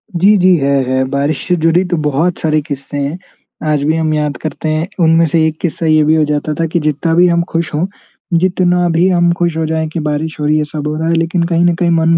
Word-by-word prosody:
जी, 195 +5 +4
जी, 185 0 +4
है, 140 -1 0 0.2
है, 130 0 +1
बारिश 140 +1 -2
से 180 - +2
जुड़ी 165 +2 +2
तो 175 - +1
बहुत 155 +4 0
सारे 155 -1 +1
किस्से 140 -1 -6
हैं। 145 +4 -2 0.5
आज 145 -2 0
भी 155 +2 +1
हम 155 -1 0
याद 150 -2 -1
करते 155 0 -4
हैं। 155 +3 -1 0.2
उनमें 165 +1 +4
से 160 +1 +2
एक 155 - -4
किस्सा 165 -1 -2
ये 155 -1 +4
भी 155 +1 +3
हो 155 - +3
जाता 150 +1 -2
था 165 - +1
कि 170 - +2
जितना 155 +2 -1
भी 175 +1 +5
हम 170 -1 +2
खुश 165 -2 -2
हों, 155 +5 0 0.5
जितना 180 -1 +1
भी 170 +2 +2
हम 175 -1 +2
खुश 170 -2 0
हो 160 - 0
जाएँ 160 0 -1
कि 165 - -2
बारिश 155 +1 -3
हो 150 - -2
रही 150 +1 +2
है, 155 - +1
सब 150 0 -5
हो 150 - -2
रहा 160 +1 -2
है - - +2
लेकिन 165 +1 0
कहीं 170 0 +1
ना 175 - +3
कहीं 175 -2 +1
मन 165 -1 +2
में 165 - +4
160 Hz, 265 wpm, -14 LUFS, 150-170 Hz, 0.5 s, भी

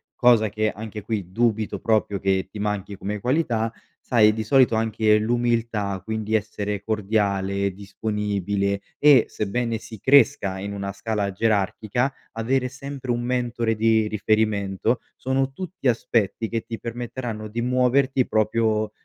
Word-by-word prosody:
cosa 120 -3 +4
che 110 +1 0
anche 105 +1 -7
qui 100 -6 -3
dubito 110 0 0
proprio 105 -3 +1
che 95 -1 0
ti 105 - -8
manchi 105 -1 -3
come 105 +2 -4
qualità, 120 -3 0 0.3
sai 110 -3 +4
di 110 0 -3
solito, 130 +1 +4
anche 110 -1 +2
l'umiltà 115 -3 0
quindi 110 +1 -2
essere 105 -1 -2
cordiale, 100 -2 0
disponibile, 100 0 -2 0.2
e 145 -5 +7
sebbene 115 +3 -2
si 110 +1 -10
cresca 125 -8 +4
in 100 +1 -5
una 100 -1 -4
scala 100 0 -2
gerarchica 110 +5 0 0.2
avere 125 +3 0
sempre 135 0 -6
un 120 0 0
mentore 120 -2 -1
di 110 0 +3
riferimento 110 +1 0 0.2
sono 130 +1 -1
tutti 180 -2 -5
aspetti 115 -2 0
che 115 -1 -1
ti 115 0 -7
permetteranno 120 -2 -5
di 115 +3 -4
muoverti 130 +1 +2
proprio 110 0 +1
110 Hz, 135 wpm, -24 LUFS, 105-120 Hz, 0.3 s, e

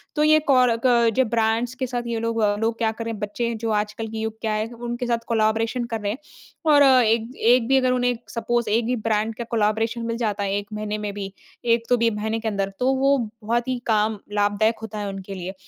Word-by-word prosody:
तो 300 - +2
ये 310 0 +6
कोराक 250 -1 +3 0.3
जो 260 - +3
ब्रांड्स 225 +2 0
के 260 0 -3
साथ 240 -1 -3
ये 230 -1 -2
लोग 230 0 -1 0.2
लोग 225 +1 0
क्या 225 -2 +1
कर 230 +1 -6
रहे 230 - -2
हैं, 210 - -8
बच्चे 230 +3 -2
जो - - 0
आजकल 210 +2 -4
के 220 0 -7
युग 220 0 -4
क्या 220 -1 -1
है 215 +1 -1
उनके 240 +1 -4
साथ 230 -1 -1
कोलैबोरेशन 225 +1 +1
कर 220 - -2
रहे 205 - -1
हैं 230 - -4 0.5
और 285 -1 +7
एक 235 -3 +4
एक 235 +1 +3
भी 270 - +4
अगर 255 -1 +2
उन्हें 245 -1 +2 0.2
सपोज 235 0 -1
एक 225 +2 +2
भी 250 +1 0
ब्रांड 220 +1 +1
का 235 - -4
कोलैबोरेशन 225 +1 0
मिल 230 0 -2
जाता 210 -3 -1
है 195 0 -1
1 205 0 -5
महीने 210 0 -3
में 210 -1 -4
भी, 195 -1 -6 0.3
एक 230 0 +3
तो 245 - +4
भी 230 0 +3
महीने 220 +1 -2
के 225 - -4
अंदर 200 -2 -1
तो 260 +2 +2
वो 275 +1 +3 0.3
बहुत 235 +3 0
ही 255 - -1
काम 215 -1 +2 0.2
लाभदायक 205 +2 +1
होता 220 -1 -6
है 205 - -3
उनके 195 0 -7
लिए। 185 +1 -5
225 Hz, 235 wpm, -23 LUFS, 215-240 Hz, 0.5 s, और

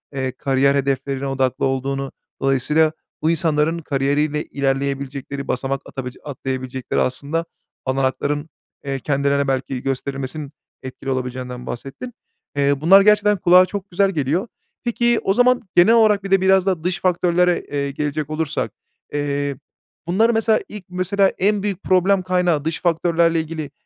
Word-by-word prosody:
eee, 130 -1 -1
kariyer 135 +1 +1
hedeflerine 135 0 -1
odaklı 130 -1 0
olduğunu, 135 +1 -2 0.3
dolayısıyla 145 +4 +2 0.3
bu 155 - +2
insanların 160 0 +1
kariyeriyle 145 0 0
ilerleyebilecekleri, 140 0 -3
basamak 135 +1 -2
atabilecek 130 -2 -7
atlayabilecekleri 130 -2 -3
aslında 145 +6 -1 0.4
olanakların, 135 +3 -1 0.4
eee, 135 -1 -2
kendilerine 140 +1 0
belki 130 -1 -2
gösterilmesinin 135 +2 -4 0.3
etkili 130 +1 -7
olabileceğinden 125 -1 -4
bahsettin. 140 - -7 0.4
Eee, 140 0 +3
bunlar 190 +5 +7
gerçekten 210 0 +4
kulağa 180 +1 +6
çok 200 0 -6
güzel 195 +2 +2
geliyor. 160 - -1 0.4
Peki, 240 0 +1
o 195 - +2
zaman 245 +2 +4
genel 180 +6 +6
olarak 215 -3 +4
bir 195 - -6
de 195 -1 +4
biraz 190 0 +4
da 185 -5 0
dış 180 0 -1
faktörlere, 180 -1 +2
eee, 140 -1 -3
gelecek 150 +1 -3
olursak, 155 -1 -2 0.4
eee, 145 -1 -1 0.5
bunları 220 +7 +3
mesela, 225 -1 +2
ilk 210 -2 -9
mesela, 185 +2 +1
en 200 +1 +1
büyük 200 -2 -3
problem 190 +1 +3
kaynağı 180 -5 +1
dış 160 - -2
faktörlerle 170 -1 +2
ilgili, 155 -2 -6
150 Hz, 140 wpm, -21 LUFS, 135-185 Hz, 0.5 s, bunlar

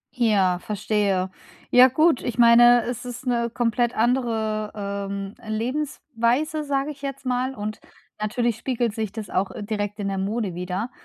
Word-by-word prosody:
Ja, 195 -7 +2
verstehe. 200 -2 -1 0.4
Ja 250 +1 +8
gut, 305 +2 +3
ich 245 -1 -4
meine, 240 0 +7
es 245 +1 -4
ist 250 +1 -7
‘ne 235 -2 0
komplett 240 0 0
andere, 220 -3 0 0.4
ähm, 200 0 -5
Lebensweise, 255 +4 -1
sage 280 0 -1
ich 285 -1 -13
jetzt 275 -1 -6
mal 255 +1 -1
und 210 0 -5 0.4
natürlich 230 +1 0
spiegelt 240 -3 -1
sich 220 -3 -3
das 215 -3 -7
auch, 190 +1 0
äh, 205 - -7
direkt 205 -1 -3
in 200 -2 -2
der 195 - -2
Mode 200 -1 -2
wieder 180 +7 -4
230 Hz, 160 wpm, -24 LUFS, 210-250 Hz, 0.4 s, Ja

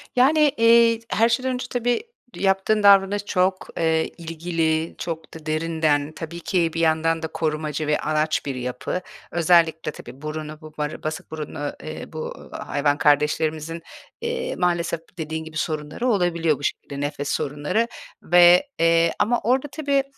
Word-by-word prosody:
Yani, 275 +5 +4 0.2
eee, 230 0 +5
t 230 - -23
her 230 +1 +3
şeyden 255 +2 0
önce 250 0 -3
tabii 245 - 0 0.3
yaptığın 195 +2 +1
davranış 200 0 +5
çok, 185 -1 0
eee, 160 -1 +2
ilgili, 165 -1 -1
çok 165 -1 -6
da 160 -1 -11
derinden 155 -2 0
tabii 170 +1 -6
ki 170 -2 0
bir 165 - -3
yandan 165 0 +2
da - - -1
korumacı 155 -1 -2
ve 150 - +2
anaç 155 0 0
bir 140 -2 -3
yapı. 125 +7 -3 0.3
Özellikle 165 -2 +3
tabii 130 0 -12
burunu 155 0 -6
bu 155 -1 -12
bar 150 0 -4
basık 155 0 -5
burunlu, 150 -2 -5
eee, 155 +1 -7
bu 155 0 -7
hayvan 145 0 -1
kardeşlerimizin, 155 +3 +1 0.4
eee, 470 +1 -2
maalesef 170 -2 0 0.2
dediğin 160 0 -4
gibi 160 0 -8
sorunları 155 +9 -2
olabiliyor 170 - +2
bu - - -11
şekilde, 140 0 -3
nefes 145 0 -3
sorunları 150 +11 -1 0.4
ve, 175 - +6
eee, 165 0 +4
ama 240 +3 +2
orada 260 +5 +2
tabii 280 -3 +1
165 Hz, 150 wpm, -23 LUFS, 155-195 Hz, 0.4 s, ve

